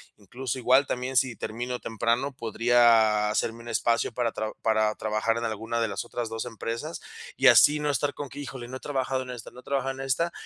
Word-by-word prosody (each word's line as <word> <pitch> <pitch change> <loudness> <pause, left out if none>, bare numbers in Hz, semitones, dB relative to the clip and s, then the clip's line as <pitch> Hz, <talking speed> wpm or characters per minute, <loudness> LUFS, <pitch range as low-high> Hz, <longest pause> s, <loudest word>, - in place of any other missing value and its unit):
Incluso, 120 +5 -5
igual, 130 +2 +4
también 125 +1 -2
si 125 -2 +2
termino 120 +4 -4
temprano, 115 +5 -1
podría 115 -3 +3
hacerme 115 +2 -1
un 120 - -12
espacio 115 0 0
para 120 -1 0
tra 110 0 -4
para 110 -1 +2
trabajar 110 +1 0
en 115 - -3
alguna 115 +1 -2
de 115 - 0
las 100 +2 -4
otras 120 -1 -4
2 115 +1 -4
empresas 115 +6 -5 0.3
y - - +4
así 150 +1 +7
no 150 - 0
estar 145 +1 0
con 145 -2 -6
que: 140 - -9
"Híjole 130 -4 -7
no 130 - -5
he - - -15
trabajado 130 -2 -2
en 125 - -8
esta, 120 -3 -9
no - - -13
he - - -14
trabajado 135 -1 -1
en 135 - -11
esta", 135 +6 0
120 Hz, 220 wpm, -27 LUFS, 115-130 Hz, 0.3 s, así